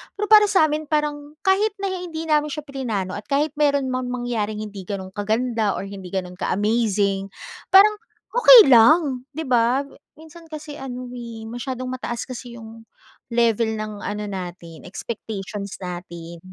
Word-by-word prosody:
Pero 420 - -2
para 425 -1 +9
sa 320 -6 +4
amin, 305 +1 -2
parang 295 -1 -2
kahit 400 +2 +2
na 395 - -1
hindi 350 -3 -5
namin 300 0 +3
siya 300 0 -5
plinano 225 -10 -4
at 205 - -9
kahit 290 +2 +1
meron 285 -3 +2
mang 255 0 -2
mangyaring 235 -4 -3
hindi 200 -3 -8
ganun 190 -2 -5
kaganda 220 +1 0
or - - -4
hindi 195 -1 -8
gano'n 180 -1 -4
ka-amazing, 205 -1 0 0.4
parang 415 +2 +6 0.3
okey 485 - +9
lang, 255 +2 +5
'di 320 - -3
ba? 245 0 +2 0.3
Minsan 320 +2 -14
kasi 305 -1 -8
ano 250 -2 -6
eh, 235 -2 -8
masyadong 255 +2 -5
mataas 250 -2 -4
kasi 245 -2 -8
'yung 225 0 -12 0.4
level 230 -1 +1
ng 215 -1 -5
ano 210 0 -3
natin 175 -4 -8
expectations 200 -1 -6
natin. 170 -1 -7
240 Hz, 150 wpm, -22 LUFS, 205-295 Hz, 0.4 s, para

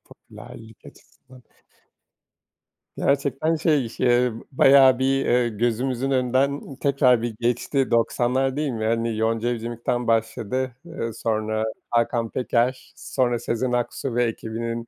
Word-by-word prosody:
I - - -63
popülerlik 110 -1 -14
açısından. 130 0 -18 1.6
Gerçekten, 140 +3 0
şey, 150 -6 +1
ş 120 - -6
ııı, 120 -2 +2
bayağı 135 -1 +6
bir, 135 +1 +1
ııı, 120 0 +2
gözümüzün 120 +4 -1
önünden 135 +2 0
tekrar 130 -3 +2
bir 120 -2 -3
geçti 125 +3 0
90'lar 125 +3 +1
değil 150 -2 -1
mi? 110 -2 -3
Hani, 115 0 0
Yonca 115 +1 0
Evcimik'ten 120 +1 -3
başladı. 115 +3 -1
Iıı, 140 -9 -5
sonra 110 0 -2 0.3
Hakan 115 0 0
Peker, 125 +1 -1
sonra 120 -3 -1
Sezen 120 +2 -2
Aksu 120 +1 -2
ve 120 - +3
ekibinin 115 0 -4
120 Hz, 125 wpm, -23 LUFS, 115-130 Hz, 1.6 s, bayağı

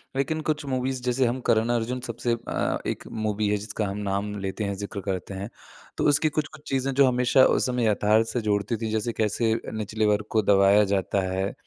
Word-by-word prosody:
लेकिन 155 +4 -1
कुछ 150 -1 -1
मूवीज़ 130 0 -1
जैसे 125 +1 +1
हम 120 +2 -1
करण 110 +1 +3
अर्जुन, 120 +2 -2
सबसे 120 +1 -1
अ, - - -1
एक - - -4 0.2
मूवी 105 0 0
है 105 - +2
जिसका 105 +1 -3
हम 100 +1 -4
नाम 100 +1 -2
लेते 95 +2 -3
हैं, 100 -1 -1
ज़िक्र 100 0 -5
करते 95 0 -3
हैं, 95 +3 -5 0.5
तो - - 0
उसकी 150 +2 +3
कुछ-कुछ 155 0 -3
चीज़ें 135 0 0
जो 135 0 +5
हमेशा 125 +1 +4
उस - - +1
समय 125 -3 0
यथार्थ 110 +1 +3
से 120 - -2
जोड़ती 105 +1 0
थीं। 110 0 -3
जैसे 110 +2 -1
कैसे 110 +1 +1 0.2
निचले 110 0 -1
वर्ग 105 0 +2
को - - +5
दबाया 100 +1 +6
जाता 100 0 0
है, 95 +1 -1
110 Hz, 205 wpm, -25 LUFS, 105-125 Hz, 0.5 s, दबाया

